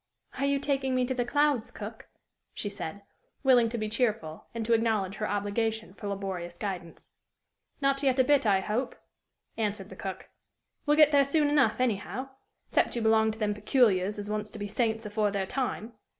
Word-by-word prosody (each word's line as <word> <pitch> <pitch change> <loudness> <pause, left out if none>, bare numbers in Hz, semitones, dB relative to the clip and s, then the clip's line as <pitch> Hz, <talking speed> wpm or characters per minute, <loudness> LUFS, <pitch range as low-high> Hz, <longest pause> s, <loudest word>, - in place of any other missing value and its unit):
"Are 275 - +1
you 280 0 +2
taking 270 -2 0
me 255 0 +2
to 260 - -1
the 250 -1 0
clouds, 290 -3 +2
cook?" - - -8 0.5
she 205 - -3
said, 200 0 -6 0.4
willing 245 -4 +5
to 235 - -4
be 215 -1 -2
cheerful, 215 -8 -1
and 230 -1 -4
to 235 - +2
acknowledge 215 -4 +1
her 215 - -2
obligation 215 +1 -1
for 205 - -7
laborious 190 -3 -4
guidance. 180 -4 -6 0.7
"Not 275 0 +2
yet 265 -2 +2
a 260 - +6
bit, 285 +1 +4
I 195 -2 +4
hope," 235 +6 -2 0.6
answered 205 -3 -2
the 190 - -10
cook; 190 0 -6 0.6
"we'll 295 +1 +4
get 305 -1 +7
there 285 -1 +6
soon 290 +1 +2
enough, 290 -3 +3
anyhow 255 +2 -1 0.4
excep' - - +1
you 235 - -1
belong 220 0 +4
to 220 - -4
them 210 -2 0
peculiars 210 -3 +2
as 205 0 -5
wants 210 0 -3
to - - -10
be 205 -1 -4
saints 220 +1 -1
afore 210 0 +1
their 200 -1 -1
time. 245 -1 -3
220 Hz, 190 wpm, -29 LUFS, 205-260 Hz, 0.7 s, get